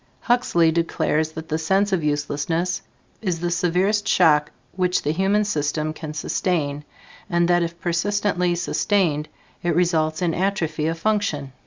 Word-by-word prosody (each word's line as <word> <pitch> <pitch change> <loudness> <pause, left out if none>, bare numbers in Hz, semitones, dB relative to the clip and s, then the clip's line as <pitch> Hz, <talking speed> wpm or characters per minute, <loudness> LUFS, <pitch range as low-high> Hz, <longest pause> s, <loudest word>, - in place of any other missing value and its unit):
Huxley 205 -10 +3
declares 160 -1 0
that 160 0 -7
the 155 +1 -1
sense 195 +5 +1
of 175 -4 +1
uselessness 150 +4 -1 0.4
is 180 -6 -1
the 175 +1 -2
severest 180 +5 +1
shock 150 -2 +4 0.3
which 180 -1 +1
the 150 - +1
human 195 +5 +2
system 155 -4 -1
can 155 -1 -7
sustain, 150 -3 -1 0.5
and 175 -2 +2
that 175 0 +3
if 170 0 -3
persistently 180 0 0
sustained, 170 -3 0 0.3
it 175 - 0
results 160 -2 +1
in 170 -2 +1
atrophy 165 -5 -1
of 165 +1 -1
function. 165 -9 -1
170 Hz, 145 wpm, -22 LUFS, 155-185 Hz, 0.5 s, shock